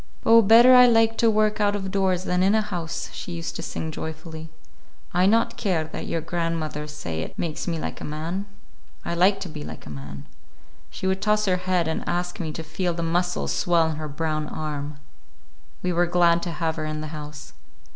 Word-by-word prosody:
"Oh, 230 0 +8
better 230 +4 +8
I 250 0 +9
like 225 -1 +4
to 230 - +5
work 215 0 +2
out 205 0 +2
of 190 -2 -4
doors 190 -2 +1
than 180 -1 0
in 195 +3 +4
a 220 - +3
house!" 175 -5 -4
she 175 - -6
used 165 0 -5
to - - -5
sing 160 - -4
joyfully. 160 +1 -7 0.6
"I 180 +2 +4
not 225 +3 +2
care 185 -7 0
that 160 - -7
your 165 - -1
grandmother 165 -2 -3
say 85 - -5
it - - -7
makes 160 0 -3
me 170 -2 -1
like - - -5
a - - -5
man. 165 +7 -4 0.6
I - - -2
like 185 +3 +4
to - - -4
be 155 -3 -7
like - - -9
a 75 - -9
man." 70 0 -8 0.6
She - - -7
would 190 +1 0
toss 210 0 +2
her 185 -2 +2
head 180 -2 0
and 160 - -2
ask 175 +2 -2
me 160 -3 -3
to 160 - -6
feel 165 +2 -2
the 170 - -3
muscles 175 +2 0
swell 165 -2 +2
in 155 - -5
her 155 0 -4
brown 155 +1 -2
arm. 150 -1 -5 0.9
We 180 0 0
were 175 +1 +2
glad 170 -1 +3
to 175 - -3
have 160 0 -2
her 155 - -3
in 155 0 -3
the 155 - -5
house. 150 -1 -8
170 Hz, 215 wpm, -24 LUFS, 155-190 Hz, 0.9 s, I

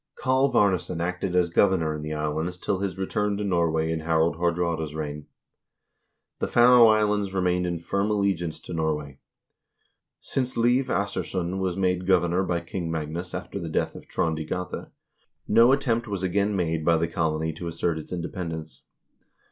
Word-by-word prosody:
Kalv 130 +1 +2
Arnesson 90 -3 +2
acted 90 +1 -2
as 90 -2 +2
governor 85 -4 +3
in 75 - -5
the 75 +1 -5
islands 80 +4 -2
till 95 +1 -2
his 95 -1 -3
return 100 +2 -1
to 105 - -3
Norway 85 -4 +1
in 80 - -1
Harald 80 +1 +1
Haardraade's 85 -3 -1
reign.1 75 -1 -5 1.1
The - - -1
Faroe 120 0 +7
Islands 105 -2 +2
remained 90 -1 +1
in 85 -1 -2
firm 100 +5 -1
allegiance 100 -6 0
to - - -8
Norway. 75 -4 -2 1.0
Since 130 -1 -3
Leiv 120 +3 +3
Assursson 95 -3 -2
was 95 -1 -1
made 90 -1 0
governor 90 -1 +3
by 85 -2 -1
King 85 0 -5
Magnus 80 +3 -4
after 100 - -5
the 85 -3 -5
death - - -1
of - - -12
Trond 80 -1 -1
i - - -3
Gata, 90 +3 -5 0.6
no 120 +2 +6
attempt 120 -4 +1
was 100 -3 -3
again 100 +3 +1
made 80 -3 -1
by 85 +1 +4
the 85 +1 0
colony 80 -1 -1
to 85 +2 -6
assert 85 0 -1
its 75 - -11
independence. 85 -5 -5
90 Hz, 165 wpm, -26 LUFS, 80-100 Hz, 1.1 s, Faroe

